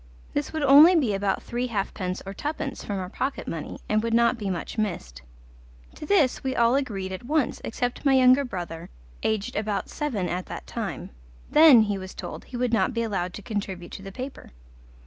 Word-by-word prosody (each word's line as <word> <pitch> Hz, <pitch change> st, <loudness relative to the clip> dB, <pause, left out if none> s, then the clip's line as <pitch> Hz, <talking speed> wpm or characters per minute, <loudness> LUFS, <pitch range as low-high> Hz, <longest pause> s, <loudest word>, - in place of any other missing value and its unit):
This 290 Hz, -1 st, -2 dB
would 315 Hz, -2 st, -2 dB
only 295 Hz, +6 st, +8 dB
be 260 Hz, -11 st, +2 dB
about 195 Hz, 0 st, -1 dB
three 245 Hz, +1 st, -2 dB
halfpence 195 Hz, -4 st, -3 dB
or 195 Hz, -, -6 dB
twopence 290 Hz, +3 st, -4 dB
from 205 Hz, -, -3 dB
our 185 Hz, -1 st, -3 dB
pocket 265 Hz, +8 st, -3 dB
money, 160 Hz, -2 st, -5 dB
and 215 Hz, 0 st, +2 dB
would 230 Hz, 0 st, 0 dB
not 235 Hz, +1 st, +4 dB
be 210 Hz, -4 st, -4 dB
much 175 Hz, -3 st, -4 dB
missed. 65 Hz, -, -3 dB, 0.7 s
To 300 Hz, -, -9 dB
this 300 Hz, -10 st, +3 dB
we 265 Hz, -1 st, -1 dB
all 235 Hz, 0 st, +4 dB
agreed 205 Hz, -9 st, -1 dB
at 190 Hz, +6 st, -7 dB
once 305 Hz, -2 st, 0 dB
except 245 Hz, +1 st, -3 dB
my 275 Hz, -2 st, +4 dB
younger 255 Hz, +1 st, +6 dB
brother, 175 Hz, -7 st, -6 dB, 0.3 s
aged 215 Hz, -2 st, -1 dB
about 210 Hz, -1 st, -2 dB
seven 235 Hz, -12 st, -2 dB
at 180 Hz, +1 st, -3 dB
that -, -, -7 dB
time. -, -, -5 dB, 0.4 s
Then, 300 Hz, -7 st, +8 dB
he 205 Hz, -2 st, -2 dB
was 185 Hz, 0 st, -9 dB
told, 175 Hz, -, -7 dB
he 245 Hz, -, -7 dB
would 245 Hz, -1 st, 0 dB
not 230 Hz, +2 st, +2 dB
be 230 Hz, -, 0 dB
allowed 185 Hz, -5 st, -2 dB
to -, -, -7 dB
contribute 195 Hz, -5 st, -4 dB
to -, -, -8 dB
the 195 Hz, 0 st, -8 dB
paper. 255 Hz, +6 st, -8 dB
225 Hz, 200 wpm, -25 LUFS, 195-265 Hz, 0.7 s, only